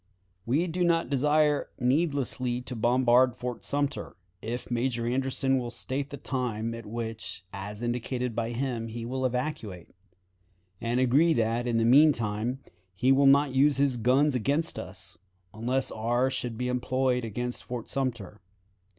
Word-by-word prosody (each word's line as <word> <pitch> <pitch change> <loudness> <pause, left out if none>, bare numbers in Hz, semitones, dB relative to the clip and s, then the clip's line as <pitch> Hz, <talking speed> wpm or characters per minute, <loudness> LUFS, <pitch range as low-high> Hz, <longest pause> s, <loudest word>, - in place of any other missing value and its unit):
"We 145 +9 +2
do 180 +1 -1
not 165 -3 +2
desire 150 +2 +2
needlessly 130 -3 0
to 125 0 -7
bombard 125 +1 +3
Fort 125 -2 -5
Sumter, 145 -1 -2 0.3
if 120 +2 -5
Major 120 -1 0
Anderson 135 +1 +1
will 120 -1 -4
state 135 +3 -3
the 145 - -7
time 115 -4 -3
at 115 -2 -8
which, 115 -3 -6
as 100 +3 -6
indicated 120 0 -2
by 115 0 -1
him, 120 -1 -2
he 115 +1 -6
will 130 +2 -1
evacuate, 120 - -4 0.9
and 120 +2 0
agree 140 +7 +4
that, 115 0 0
in 120 -1 +1
the 115 - +2
mean 145 +6 +7
time, 115 +3 -2 0.3
he 125 +7 +3
will 135 +1 +5
not 140 0 +5
use 140 +2 +4
his 140 -2 +2
guns 130 +5 +3
against 140 +7 0
us, 95 -1 -8 0.3
unless 125 +5 -1
ours 120 +4 0
should 120 -3 -3
be 125 +1 -2
employed 125 0 0
against 120 +3 -4
Fort 120 -2 -6
Sumter. 115 -7 -3
125 Hz, 150 wpm, -28 LUFS, 115-135 Hz, 0.9 s, mean